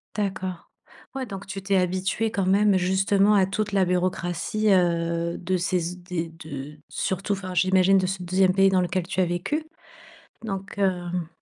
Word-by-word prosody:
D'accord. 190 -4 -3 0.5
Ouais 265 -1 -2
donc 200 -3 -8
tu 195 -1 -5
t'es 195 +1 0
habituée 185 +4 0
quand 195 -3 -1
même 200 +1 +4
justement 195 +3 +3
à 195 -2 +5
toute 205 +2 -2
la 195 -2 +3
bureaucratie, 180 +3 -1
heu, 170 -1 +1
de 185 +1 -1
ces 180 +1 0
z 175 +2 -4
des 170 -2 -3
de 150 -3 -8
surtout 190 +2 -2
enfin, 185 -2 -5
j'imagine 185 +1 +4
de 185 - +2
ce 190 0 -3
2e 185 +1 +3
pays 195 0 +5
dans 190 -1 +3
lequel 180 +1 -1
tu 185 - -3
as 185 - +4
vécu? 175 - -2 0.8
Donc, 195 -2 -5
hem 180 -3 -1
185 Hz, 175 wpm, -25 LUFS, 175-195 Hz, 0.8 s, à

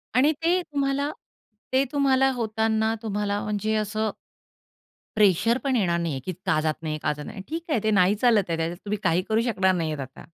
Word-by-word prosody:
आणि 285 +5 +5
ते 345 +2 +4
तुम्हाला 280 0 -1 0.6
ते 265 +1 +4
तुम्हाला 270 -2 +3
होताना 220 -1 0
तुम्हाला 205 -1 -2
म्हणजे 210 +1 -1
असं 215 0 -1 1.1
प्रेशर 215 +4 +4
पण 270 -2 +1
येणार 180 -7 +2
नाहीये 160 -6 -2
की 185 - -2
का 175 -5 +2
जात 155 0 +1
नाहीये, 155 -1 -3
का - - +1
जात 150 0 -8
नाहीये. 190 - -8
ठीक 325 +1 -4
आहे, 235 - +2
ते 215 - +2
नाही 195 +1 +4
चालत 220 -2 +3
आहे. 165 - 0
त्याच्यात 165 +1 -2
तुम्ही 210 +1 -1
काही 175 0 +2
करू 220 +1 +3
शकणार 190 -3 +2
नाहीयेत 155 -4 -2
आता. 130 0 -8
210 Hz, 190 wpm, -25 LUFS, 180-245 Hz, 1.1 s, आणि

